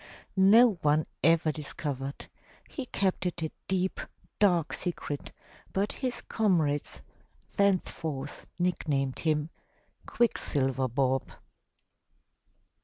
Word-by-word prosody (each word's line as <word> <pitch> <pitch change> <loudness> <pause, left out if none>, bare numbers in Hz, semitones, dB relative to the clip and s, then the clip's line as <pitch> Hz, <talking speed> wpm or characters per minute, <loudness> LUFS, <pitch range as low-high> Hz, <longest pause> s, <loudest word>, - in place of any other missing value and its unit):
No 205 +1 +6
one 150 +1 +3 0.2
ever 165 0 +4
dis 150 -1 -7
covered; 140 -2 -4 0.4
he 270 -4 -6
kept 190 -4 0
it 175 -1 -4
a 160 - -2 0.2
deep, 185 0 0 0.4
dark 175 -6 +3
secret, 160 -5 -4 0.4
but 200 +2 0
his 255 -3 -3
comrades 165 -10 0 0.5
thence 200 -2 +2
forth 145 -3 -5
nicknamed 145 -7 0
him 155 0 0 0.6
"Quicksilver 135 - +1
Bob." 130 +1 0
165 Hz, 100 wpm, -29 LUFS, 145-190 Hz, 0.6 s, No